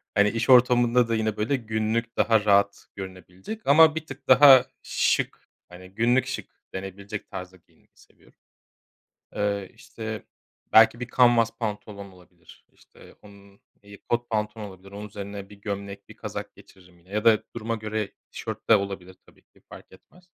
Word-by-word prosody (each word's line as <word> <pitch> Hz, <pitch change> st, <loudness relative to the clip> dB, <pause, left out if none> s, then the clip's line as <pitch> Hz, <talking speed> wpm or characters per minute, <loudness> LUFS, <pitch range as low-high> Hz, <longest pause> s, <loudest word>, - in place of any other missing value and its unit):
Hani, 105 Hz, 0 st, +4 dB
iş 115 Hz, +3 st, -3 dB
ortamında 120 Hz, -1 st, +5 dB
da 115 Hz, -, +1 dB
yine, 110 Hz, -1 st, -1 dB
böyle, 110 Hz, +7 st, 0 dB
günlük 115 Hz, 0 st, -2 dB
daha 110 Hz, -1 st, +3 dB
rahat 100 Hz, 0 st, +2 dB
görünebilecek 95 Hz, -, -9 dB
ama 155 Hz, +2 st, +6 dB
bir 160 Hz, -1 st, -4 dB
tık 135 Hz, -2 st, -11 dB
daha 130 Hz, -1 st, +8 dB, 0.2 s
şık, -, -, -1 dB, 0.2 s
hani, 90 Hz, +1 st, -13 dB
günlük 120 Hz, +5 st, +1 dB
şık 135 Hz, -, -5 dB, 0.2 s
denebilecek 100 Hz, +2 st, -7 dB
tarzda 90 Hz, 0 st, -8 dB
giyinmeyi 85 Hz, -, -32 dB
seviyorum. -, -, -24 dB, 1.1 s
Eee, 100 Hz, -2 st, -2 dB
işte, 110 Hz, -1 st, -8 dB, 0.5 s
belki 115 Hz, +2 st, +6 dB
bir 125 Hz, -, -5 dB
canvas 115 Hz, -2 st, +4 dB
pantolon 105 Hz, -3 st, -6 dB
olabilir, 90 Hz, -1 st, -20 dB
işte, -, -, -19 dB
onun, 100 Hz, -1 st, -18 dB, 0.2 s
iii, 100 Hz, 0 st, -15 dB
kot 120 Hz, 0 st, -1 dB
pantolon 105 Hz, 0 st, -2 dB
olabilir, 95 Hz, +1 st, -15 dB
onun 105 Hz, +1 st, -8 dB
üzerine 100 Hz, -1 st, -8 dB
bir 105 Hz, -, -14 dB
gömlek, 100 Hz, -1 st, -6 dB
bir -, -, -14 dB
kazak -, -, -7 dB
geçiririm 90 Hz, -2 st, -20 dB
yine 85 Hz, +2 st, -26 dB
ya 105 Hz, +2 st, -2 dB
da 110 Hz, -2 st, +5 dB
duruma 115 Hz, 0 st, -3 dB
göre 110 Hz, -1 st, -4 dB, 0.2 s
tişört -, -, -7 dB
de 110 Hz, -, +9 dB
olabilir 95 Hz, -2 st, -6 dB
tabii -, -, -23 dB
ki -, -, -29 dB
fark -, -, -14 dB
etmez. 180 Hz, -, -20 dB
105 Hz, 160 wpm, -25 LUFS, 100-115 Hz, 1.1 s, de